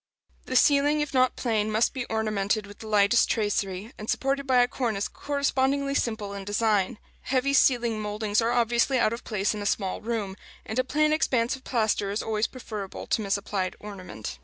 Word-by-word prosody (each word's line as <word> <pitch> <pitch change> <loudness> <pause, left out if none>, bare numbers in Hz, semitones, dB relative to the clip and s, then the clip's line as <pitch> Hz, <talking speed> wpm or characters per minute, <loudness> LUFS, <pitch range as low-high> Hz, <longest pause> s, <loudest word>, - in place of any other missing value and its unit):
The 255 - -3
ceiling, 290 +3 +4
if 295 -1 -3
not 255 -1 +3
plain, 220 -3 0
must 220 +2 +2
be 260 -2 -3
ornamented 215 -1 -1
with 205 0 -13
the 220 - -9
lightest 210 +2 +4
tracery, 205 -1 -1
and 215 - -7
supported 275 +1 0
by 250 -2 +5
a - - +1
cornice 225 -6 -2
correspondingly 280 -1 0
simple 220 -6 -2
in 200 -1 -6
design. 205 -1 +1 0.3
Heavy 270 +1 +1
ceiling 240 -5 +3
mouldings 210 +1 0
are 230 +1 +1
obviously 240 +2 +2
out 230 -2 +2
of 235 - -6
place 210 -2 -1
in 210 - -5
a 205 - -2
small 195 -2 -1
room, 215 -4 -3 0.3
and 220 +3 -3
a - - +3
plain 305 +4 +2
expanse 250 -5 +1
of 265 - -14
plaster 215 -4 0
is 205 +2 -2
always 220 0 0
preferable 215 -6 -7
to - - 0
misapplied 195 -2 -2
ornament. 145 - -8
220 Hz, 185 wpm, -26 LUFS, 205-255 Hz, 0.3 s, by